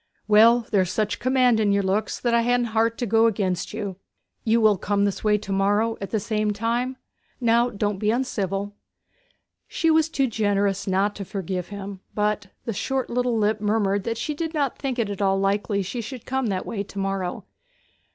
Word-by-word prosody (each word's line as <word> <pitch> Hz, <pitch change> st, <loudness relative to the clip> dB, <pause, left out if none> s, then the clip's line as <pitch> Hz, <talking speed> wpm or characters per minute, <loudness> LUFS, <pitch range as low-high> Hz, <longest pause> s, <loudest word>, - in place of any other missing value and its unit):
'Well, 225 Hz, +3 st, +6 dB
there's 190 Hz, -4 st, +2 dB
such 210 Hz, -1 st, -1 dB
command 255 Hz, -3 st, +3 dB
in 210 Hz, -2 st, +2 dB
your 200 Hz, 0 st, +2 dB
looks 195 Hz, +3 st, -1 dB
that 240 Hz, -1 st, 0 dB
I 235 Hz, -, +4 dB
ha'n't 245 Hz, 0 st, +1 dB
heart 225 Hz, +1 st, +1 dB
to 245 Hz, -, -1 dB
go 225 Hz, +1 st, +4 dB
against 190 Hz, -5 st, -1 dB
you. 205 Hz, -4 st, -5 dB, 0.5 s
You 230 Hz, 0 st, +3 dB
will 215 Hz, -4 st, +4 dB
come 200 Hz, 0 st, +1 dB
this 200 Hz, -, -2 dB
way 210 Hz, -1 st, +3 dB
to 205 Hz, -1 st, -7 dB
morrow 205 Hz, +4 st, +2 dB
at 195 Hz, -, -4 dB
the 220 Hz, -, 0 dB
same 215 Hz, 0 st, -1 dB
time? 240 Hz, +5 st, -1 dB, 0.4 s
Now, 235 Hz, 0 st, +3 dB
don't 205 Hz, -2 st, -2 dB
be 210 Hz, -, +1 dB
uncivil.' 205 Hz, -5 st, -1 dB, 0.9 s
She 325 Hz, -1 st, +1 dB
was 320 Hz, 0 st, +3 dB
too 275 Hz, -4 st, +1 dB
generous 205 Hz, -4 st, 0 dB
not 195 Hz, +2 st, +1 dB
to 200 Hz, -, -4 dB
forgive 185 Hz, -2 st, -4 dB
him, 200 Hz, -1 st, -7 dB, 0.2 s
but 210 Hz, -2 st, 0 dB, 0.2 s
the 230 Hz, -, -2 dB
short 265 Hz, +5 st, -2 dB
little 245 Hz, -1 st, +1 dB
lip 215 Hz, 0 st, +1 dB
murmured 205 Hz, -2 st, +1 dB
that 230 Hz, 0 st, -2 dB
she 300 Hz, -, -2 dB
did 320 Hz, +2 st, -4 dB
not 280 Hz, -4 st, 0 dB
think 265 Hz, -3 st, -2 dB
it 220 Hz, -4 st, 0 dB
at 200 Hz, -, -5 dB
all 195 Hz, -1 st, +2 dB
likely 200 Hz, +1 st, 0 dB
she 235 Hz, +6 st, -4 dB
should 245 Hz, +1 st, -8 dB
come 265 Hz, -1 st, -1 dB
that 190 Hz, -3 st, -2 dB
way 205 Hz, -, -3 dB
to 200 Hz, 0 st, -9 dB
morrow. 195 Hz, -2 st, -2 dB
210 Hz, 200 wpm, -24 LUFS, 200-235 Hz, 0.9 s, Well